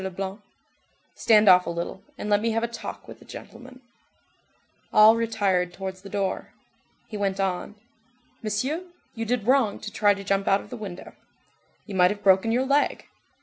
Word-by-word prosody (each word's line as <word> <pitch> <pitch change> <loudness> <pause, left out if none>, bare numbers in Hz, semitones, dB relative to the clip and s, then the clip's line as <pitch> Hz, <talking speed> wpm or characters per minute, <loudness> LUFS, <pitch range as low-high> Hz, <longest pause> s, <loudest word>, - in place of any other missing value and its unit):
Leblanc:— 190 +2 -5 0.7
"Stand 215 -2 +4
off 180 -1 +7
a - - -1
little, 170 +3 -5 0.2
and - - -5
let 205 0 +3
me 230 - 0
have 225 +1 0
a - - +1
talk 235 0 -8
with - - -11
the - - -16
gentleman." 255 +1 -12 1.1
All 215 +1 +7
retired 200 -6 0
towards 190 0 -6
the 195 - -11
door. 195 -1 -3 0.5
He 215 - -6
went 200 -1 -1
on:— 190 +1 -2 0.7
"Monsieur, 240 +10 -2 0.3
you 225 0 -4
did 235 -2 -1
wrong 250 -5 +2
to 215 - -7
try 205 -1 +3
to 200 - -8
jump 195 0 0
out 195 +1 +3
of - - -15
the - - -5
window. 195 -6 -8 0.7
You 205 - -8
might 180 -1 +5
have 205 +1 -5
broken 195 +3 +4
your 250 +3 +1
leg. 280 +2 +1
205 Hz, 180 wpm, -25 LUFS, 190-225 Hz, 1.1 s, off